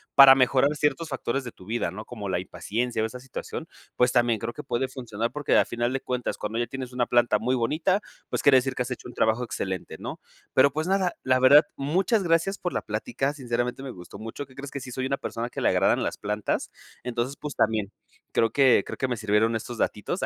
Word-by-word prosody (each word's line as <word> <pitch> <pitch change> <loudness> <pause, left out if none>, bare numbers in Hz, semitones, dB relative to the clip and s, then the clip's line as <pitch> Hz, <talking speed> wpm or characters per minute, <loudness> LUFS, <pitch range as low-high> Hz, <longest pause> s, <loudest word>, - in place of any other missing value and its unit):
para 135 -1 +11
mejorar 135 +2 +3
ciertos 150 +2 0
factores 135 0 -2
de 120 - -7
tu 90 - -16
vida, 110 -6 -1
¿no?, 105 +4 -8
como 110 -5 -7
la 95 -2 0
impaciencia 110 +5 -2
o - - +2
esa 125 +3 -6
situación. 130 0 -7 0.3
Pues 125 0 +3
también 120 -3 +2
creo 115 +3 -3
que 150 - -8
puede 130 -1 -1
funcionar 115 -4 -4
porque 150 -2 0
al - - +4
final 120 +1 -1
de 135 - 0
cuentas, 125 -1 -2
cuando 105 +2 -3
ya 120 - +1
tienes 130 +1 -6
una 125 -1 0
planta 120 -3 +3
muy 125 +4 0
bonita. 155 - +1 0.3
Pues - - -1
quiere 140 -2 +6
decir 130 0 +1
que - - -3
has 125 - -2
hecho 125 - -6
un 125 - -10
trabajo 110 +3 +1
excelente, 95 -5 -4
¿no?, - - -6 0.4
pero 135 +1 +5
pues 155 +3 -2
nada, 190 -2 +1
la 130 0 +2
verdad. 140 +4 +8
Muchas 185 - +1
gracias 170 +4 +2
por 180 - -3
la - - -1
plática. 120 +6 -2
Sinceramente, 125 -1 -2
me 135 - -5
gustó 90 -1 -11
mucho. 115 +6 -7
¿Qué 130 - -19
crees 140 +1 -7
que 140 - -4
sí 130 -1 -8
soy 130 +1 -3
una 140 +1 0
persona 120 -1 -4
que - - -5
le - - +4
agradan - - +3
las - - -2
plantas? 105 0 -2 0.3
Entonces 125 +3 -2
pues 150 -1 -6
también 110 -2 +1 0.4
creo 115 - +2
que 135 -3 +5
creo - - -6
que 130 - 0
me 120 - -1
sirvieron 110 +1 +2
estos 115 +2 -5
datitos 110 - -1
125 Hz, 235 wpm, -26 LUFS, 115-140 Hz, 0.4 s, para